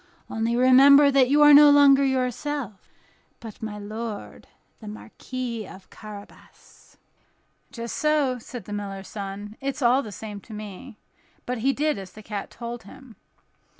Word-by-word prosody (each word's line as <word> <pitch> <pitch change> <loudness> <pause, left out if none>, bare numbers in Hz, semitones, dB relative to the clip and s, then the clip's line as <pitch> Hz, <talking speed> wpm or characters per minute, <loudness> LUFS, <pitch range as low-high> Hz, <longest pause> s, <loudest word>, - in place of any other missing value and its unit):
Only 225 +1 -1
remember 275 +3 +6
that 265 -2 +3
you 295 +2 +5
are 295 0 +8
no 295 +1 +9
longer 280 -1 +6
yourself, 260 -3 -3 0.5
but 225 -3 -11
my 215 -2 -5
lord 215 +1 -7 0.3
the 215 - -12
Marquis 230 +1 -7
of 190 - -14
Carabas." 210 -2 -14 0.7
"Just 235 -1 -6
so," 295 -5 +1
said 240 +1 -9
the 205 - -7
miller's 195 -2 -6
son, 205 +1 -7
"it's 275 0 -3
all 250 +3 +4
the 215 - -9
same 205 0 -8
to 220 - -13
me;" 210 +3 -10 0.5
but 250 -1 -3
he 265 +5 +2
did 300 -4 -1
as 185 -2 -10
the 215 - -13
cat 205 -2 -6
told 235 0 -7
him. 235 +3 -15
235 Hz, 150 wpm, -24 LUFS, 210-270 Hz, 0.7 s, no